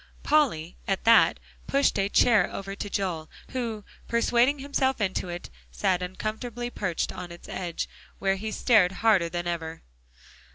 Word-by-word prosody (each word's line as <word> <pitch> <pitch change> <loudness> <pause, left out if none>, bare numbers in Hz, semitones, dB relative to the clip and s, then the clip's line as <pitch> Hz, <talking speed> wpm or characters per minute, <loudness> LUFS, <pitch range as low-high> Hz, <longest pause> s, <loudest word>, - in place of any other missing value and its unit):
Polly 225 - +2
at 195 -1 0
that, 230 0 +6 0.3
pushed 275 -6 +2
a 195 0 +1
chair 215 -4 +4
over 195 0 -5
toward 205 0 -6
Joel, 170 -5 -2 0.2
who 230 -5 -3 0.2
persuading 240 +4 +3
himself 270 -2 0
into 190 -3 -1
it, 175 0 -7 0.2
sat 180 - 0
uncomfortably 220 +6 -4
perched 180 -8 -2
on 175 - -7
its 170 - -11
edge, 175 -3 -4 0.3
where 195 0 +1
he 215 +2 -4
stared 210 -8 +4
harder 195 -6 +3
than 175 +1 -3
ever. 165 -2 -4
200 Hz, 150 wpm, -27 LUFS, 175-235 Hz, 0.3 s, that